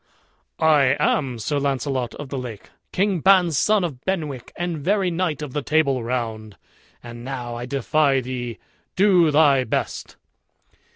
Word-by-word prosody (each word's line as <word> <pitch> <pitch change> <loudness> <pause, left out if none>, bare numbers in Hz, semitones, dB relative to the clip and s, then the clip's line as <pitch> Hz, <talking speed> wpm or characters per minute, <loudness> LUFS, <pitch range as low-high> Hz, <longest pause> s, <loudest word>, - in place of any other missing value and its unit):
"I 150 -4 +4
am 130 -5 +1
Sir 145 +7 -2
Launcelot 135 -3 -2
of 145 -2 -8
the 140 - -4
Lake, 120 -5 -8 0.2
King 195 -1 +1
Ban's 180 -2 +4
son 210 +6 +3
of 140 -7 -5
Benwick, 155 -9 -3
and 175 -2 -3
very 190 +3 +1
knight 165 -4 -2
of 140 -4 -7
the 150 - -1
Table 140 -4 +1
Round; 110 -3 -4 0.5
and 120 0 -9
now 125 -2 -5
I 120 +1 -6
defy 140 +1 +1
thee 120 -2 -5 0.4
do 185 -4 +4
thy 145 -3 +4
best." 110 - -3
140 Hz, 150 wpm, -22 LUFS, 125-165 Hz, 0.5 s, I